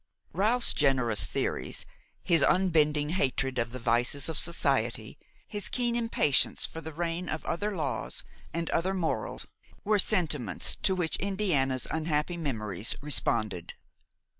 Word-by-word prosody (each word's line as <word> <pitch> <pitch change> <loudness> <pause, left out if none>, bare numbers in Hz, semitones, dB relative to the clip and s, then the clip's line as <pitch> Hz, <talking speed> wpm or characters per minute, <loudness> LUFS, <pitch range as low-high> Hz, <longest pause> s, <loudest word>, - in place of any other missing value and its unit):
Ralph's 220 +8 +3
generous 130 -7 +2
theories, - - -2 0.4
his 165 -3 +3
unbending 150 -5 +3
hatred 135 -6 0
of 115 -1 0
the 125 - -7
vices 120 +5 0
of 160 - -3
society, 120 -9 -1 0.3
his 205 -2 -3
keen 240 -2 0
impatience 230 - +2
for 165 - -7
the 160 - -7
reign 170 +2 -3
of 155 - -4
other 205 +5 -2
laws 145 -6 -3 0.3
and 165 0 -2
other 185 +3 0
morals 170 -4 -2 0.4
were 210 0 +2
sentiments 155 - +2
to 190 - +1
which 175 -3 0
Indiana's 170 - 0
unhappy 160 +1 0
memories 110 - -2
responded. 110 - +1
155 Hz, 130 wpm, -29 LUFS, 130-180 Hz, 0.4 s, Ralph's